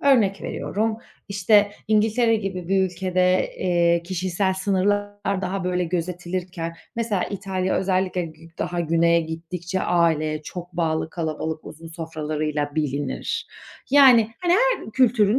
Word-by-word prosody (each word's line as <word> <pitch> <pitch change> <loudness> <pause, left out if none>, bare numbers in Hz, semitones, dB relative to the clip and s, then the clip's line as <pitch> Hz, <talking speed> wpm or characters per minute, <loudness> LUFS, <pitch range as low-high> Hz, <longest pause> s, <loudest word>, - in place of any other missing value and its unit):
Örnek 225 -9 +3
veriyorum: 220 +2 -2 0.3
işte, 205 +1 +4 0.2
İngiltere 220 +2 +3
gibi 190 -4 -4
bir 195 0 +3
ülkede, 185 0 +1
eee, 170 -1 +2
kişisel 185 +1 -1
sınırlar 200 +1 0
daha, 190 0 -2
böyle, 180 0 0
gözetilirken 175 0 -3 0.2
mesela 225 -5 0
İtalya 190 -1 -1
özellikle 185 -1 0
gü 165 0 -10
daha 175 -1 -2
güneye 170 +1 +3
gittikçe 170 +3 -4
aileye 155 -3 +1
çok 175 +2 -8
bağlı 160 -2 -1
kalabalık 160 -1 -3
uzun 165 +2 -10
sofralarıyla 155 -2 -3
bilinir. 145 - -2 0.4
Yani, 255 -6 +7
hani 350 -1 +2
her - - +2
kültürün 230 -2 +3
180 Hz, 120 wpm, -23 LUFS, 165-205 Hz, 0.4 s, Yani